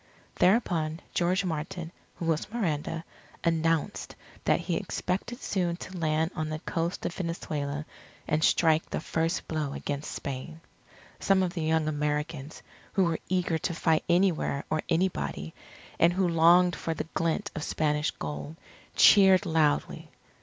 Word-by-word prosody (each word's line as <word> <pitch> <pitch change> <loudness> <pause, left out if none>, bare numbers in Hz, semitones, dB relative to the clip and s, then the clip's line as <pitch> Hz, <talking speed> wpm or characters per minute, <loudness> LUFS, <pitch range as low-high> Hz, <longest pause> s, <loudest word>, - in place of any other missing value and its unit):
Thereupon 170 -6 +2
George 185 +3 +1
Martin 165 +1 -4 0.2
who 170 - -5
was 165 +2 0
Miranda 165 -6 -2 0.4
announced 165 -1 0 0.3
that - - +3
he - - -2
expected 200 +7 -3
soon 180 -8 -1
to 185 +1 -9
land 160 0 0
on 155 0 -2
the 155 - -2
coast 165 +2 -3
of - - -2
Venezuela 155 -5 -3 0.4
and 155 0 +1
strike 160 0 +3
the - - -2
first 165 +2 -1
blow 150 -3 -2
against 145 0 -4
Spain. 140 +3 -6 0.6
Some 195 -1 +3
of 180 -1 -2
the 170 - -3
young 160 0 +1
Americans, 150 0 -3 0.3
who 195 - +3
were 170 -2 0
eager 180 -3 +1
to 170 +1 -2
fight 160 -2 +2
anywhere 170 -5 +2
or 155 0 +1
anybody, 80 - -1 0.5
and 170 +1 +5
who 185 0 +2
longed 170 +1 +5
for 165 - -3
the - - -3
glint 165 +5 -1
of 155 - -4
Spanish 150 -1 0
Gold, 75 +1 -6 0.4
cheered 190 -2 +7
loudly. 160 -4 +1
165 Hz, 145 wpm, -28 LUFS, 155-180 Hz, 0.6 s, cheered